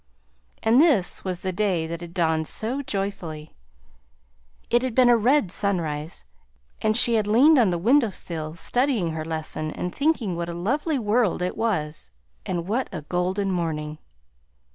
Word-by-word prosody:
And 230 +5 +5
this 275 - +2
was 180 -2 -4
the 190 -2 -3
day 185 -4 0
that 165 +1 -6
had 170 0 -9
dawned 160 -2 +1
so 245 +6 0
joyfully! 195 - -4 1.2
It 240 - +4
had 255 -3 -3
been 255 -2 +5
a - - +6
red 240 -2 +2
sunrise, 165 - -2 0.6
and 215 +1 +3
she 240 -1 +5
had 215 -2 +1
leaned 270 +8 +5
on 225 -6 +4
the 175 - 0
window 235 +6 +3
sill 160 -4 -5
studying 240 - 0
her 160 0 -4
lesson 155 -1 -4
and 180 +3 -5
thinking 280 - 0
what 170 0 -4
a 170 - -5
lovely 285 - -1
world 215 -5 +1
it 180 - -2
was. 155 - -2 0.4
And 170 0 -3
what 240 +6 -1
a 160 -5 -6
golden 185 +5 -1
morning! 155 -3 -3
190 Hz, 165 wpm, -24 LUFS, 165-235 Hz, 1.2 s, a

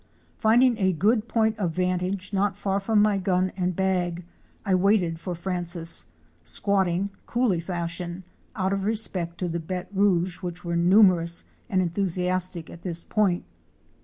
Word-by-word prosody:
Finding 235 +2 +3
a 190 -1 +2
good 215 +6 +1
point 220 -1 +1
of 175 -5 -1
vantage 185 +2 -1
not 200 0 0
far 200 -1 -1
from 210 +1 +2
my 210 -2 +2
gun 185 -1 +1
and 180 -1 -1
bag, 180 -2 -1 0.4
I 195 - +1
waited 185 -3 +2
for 180 0 -5
Francis, 175 -1 -1 0.3
squatting 190 - 0 0.2
—coolie 235 -8 +1
fashion 175 +1 -4 0.3
—out 190 -2 0
of 195 -1 -2
respect 190 -6 -1
to 180 - -2
the 170 0 -2
béte 180 +2 -5
rouge 185 -3 +2
which 175 -1 -6
were 170 0 -2
numerous 175 -1 +4 0.2
and 185 -4 +2
en 170 - -2
thusiastic 180 -2 -1
at 170 - -12
this 170 -2 +2
point! 200 -5 +1
185 Hz, 155 wpm, -25 LUFS, 175-200 Hz, 0.4 s, numerous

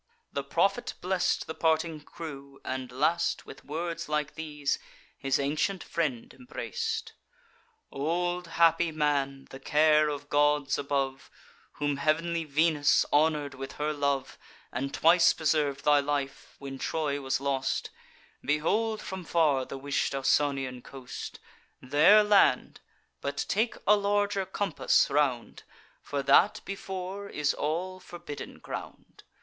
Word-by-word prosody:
"The 140 - -2
prophet 195 - 0
bless'd 185 0 0
the 160 - -5
parting 160 0 +1
crew, 140 -3 -9
and 130 -1 -4
last, 155 +7 0
With - - -12
words 165 +2 -4
like 150 -1 -1
these, 150 -2 -2 0.4
his 135 +1 0
ancient 155 +7 -1
friend 150 -8 -2
embrac'd: 450 - -4 0.8
'Old 175 +4 -1
happy 165 0 +3
man, 140 -3 0
the 135 - -9
care 150 +2 +4
of 145 -1 -5
gods 145 -1 +2
above, 135 -1 -2 0.4
Whom 145 -1 -1
heav'nly 165 +3 0
Venus 150 0 +3
honour'd 150 -1 +2
with 135 0 -7
her 150 +1 -2
love, 140 -2 -1 0.3
And 135 +3 -3
twice 170 +3 +5
preserv'd 150 -3 0
thy 145 -1 +6
life, 140 -1 -3
when 135 -1 -8
Troy 145 -3 -1
was 135 -1 -1
lost, 135 -1 -1 0.5
Behold 210 +10 0
from 190 0 -6
far 150 -6 +2
the 135 - -7
wish'd 140 0 -1
Ausonian 135 -2 +1
coast: 130 -1 -8 0.4
There 150 +11 +6
land; 205 -11 +3 0.4
but 140 0 -2
take 220 +3 +1
a 210 - +6
larger 205 -1 0
compass 185 -7 +1
round, 140 -5 0 0.4
For 140 -1 -3
that 185 +8 +5
before 195 0 -5
is 150 -1 0
all 180 +5 -2
forbidden 175 -5 -8
ground. - - -9
150 Hz, 125 wpm, -29 LUFS, 140-170 Hz, 0.8 s, thy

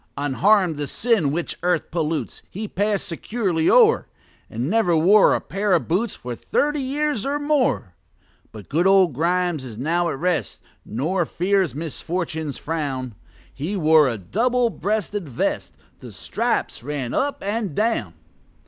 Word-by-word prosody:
Unharm'd, 170 +5 +2
the 145 -1 -3
sin 210 - +1
which 170 +3 -3
earth 175 -2 0
pollutes 160 -2 -2
He 215 +3 -5
pass'd 205 +1 -1
securely 180 -2 -1
o'er, 465 -2 +5 0.4
And 120 +4 -3
never 180 -3 +2
wore 195 +6 +5
a - - 0
pair 200 0 -1
of 170 - +1
boots 195 +7 0
For 125 0 -6
thirty 295 - 0
years 280 -3 -1
or 280 +1 -1
more. 290 - 0 0.6
But 105 -3 -11
good 170 +6 +2
old 190 -5 +5
Grimes 175 +1 0
is 120 -5 -8
now 170 +6 0
at 145 - -3
rest, 180 +2 -2 0.2
Nor 165 - -1
fears 185 -4 0
misfortune's 160 -1 -4
frown: 140 -6 -3 0.4
He 160 +9 -4
wore 155 -3 +5
a 120 -3 -2
double 235 - +1
breasted 205 -5 -2
vest 120 - -2 0.2
The - - -10
stripes - - -2
ran 135 -2 -4
up 285 +1 -1
and 205 -5 -2
down. 210 - 0
175 Hz, 150 wpm, -22 LUFS, 150-210 Hz, 0.6 s, o'er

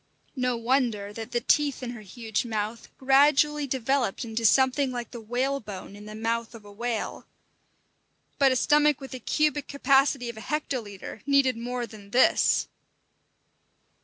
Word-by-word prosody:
No 250 -2 0
wonder 230 -4 0
that 225 +1 -7
the 240 - 0
teeth 285 +1 +1
in 240 - -4
her 240 -3 -9
huge 220 +1 -3
mouth 220 -1 -4
gradually 285 +2 +4
developed 260 -3 -1
into 225 0 -3
something 265 +3 +3
like 240 -2 -5
the 235 - -8
whalebone 235 -4 -3
in 205 +1 -11
the 215 - -8
mouth 230 +1 -2
of 215 -2 -13
a 205 - -12
whale 230 +2 -4 1.1
But 275 -2 +5
a - - +2
stomach 295 +2 +3
with 270 - -9
the 255 - -6
cubic 295 +3 0
capacity 275 -2 +2
of 235 -2 -6
a - - -8
hectolitre 230 -10 -4
needed 275 -3 +3
more 240 +1 -3
than 210 -3 -13
this! 250 +5 +3
245 Hz, 155 wpm, -26 LUFS, 225-275 Hz, 1.1 s, But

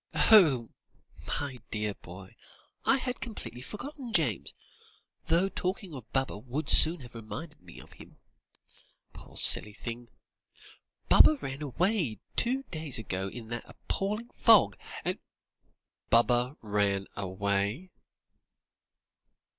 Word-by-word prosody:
"Oh! 150 - +5 0.6
my 135 -3 -4
dear 105 -1 -2
boy, 95 +1 -13 0.5
I 270 - +3
had 250 -1 -5
completely 210 - -7
forgotten 245 - -8
James, 130 - 0 0.7
though 175 +4 +2
talking 185 -1 -4
of 130 -5 -11
Baba 135 -6 -2
would 130 +6 -4
soon 160 0 +4
have 120 -2 -13
reminded 150 +7 -9
me - - -14
of - - -15
him - - -16 1.0
poor - - -13
silly 105 - +9
thing! 120 +2 -8 1.0
Baba 310 - +6
ran 135 - -7
away 155 - -1 0.2
two 260 +3 +1
days 155 -5 -1
ago 95 -3 -3
in 110 +2 -9
that 120 -1 -7
appalling 210 +4 -4
fog 205 - +4 0.3
and - - -2 0.5
" - - -45
"_Baba 120 +3 +3
ran 100 -2 0
away? 100 - -2
130 Hz, 115 wpm, -29 LUFS, -, 1.0 s, silly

